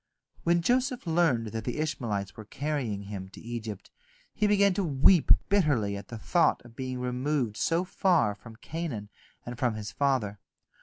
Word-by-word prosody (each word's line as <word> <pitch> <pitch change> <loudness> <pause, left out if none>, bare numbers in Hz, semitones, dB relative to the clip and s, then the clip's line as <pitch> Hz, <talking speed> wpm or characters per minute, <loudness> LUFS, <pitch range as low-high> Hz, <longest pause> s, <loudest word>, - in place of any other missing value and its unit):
When 170 0 +2
Joseph 255 - +1
learned 160 -10 +2
that 110 +1 -4
the 125 - -3
Ishmaelites 115 -10 -2
were 110 - -9
carrying 130 -6 -3
him 100 -2 -7
to - - -13
Egypt, 115 -4 -6 0.4
he 210 - +1
began 200 -1 +4
to 195 - 0
weep 155 +2 +4 0.2
bitterly 145 - +2
at 100 - -8
the 115 - -7
thought 170 +9 +2
of 120 -1 -15
being 130 0 -4
removed 125 -1 -1
so 165 +9 +1
far 175 - +2
from 110 +2 -13
Canaan 120 -6 -5 0.4
and 120 0 -7
from 120 -4 +1
his 105 -1 -5
father. 125 -8 0
125 Hz, 165 wpm, -28 LUFS, 110-165 Hz, 0.4 s, began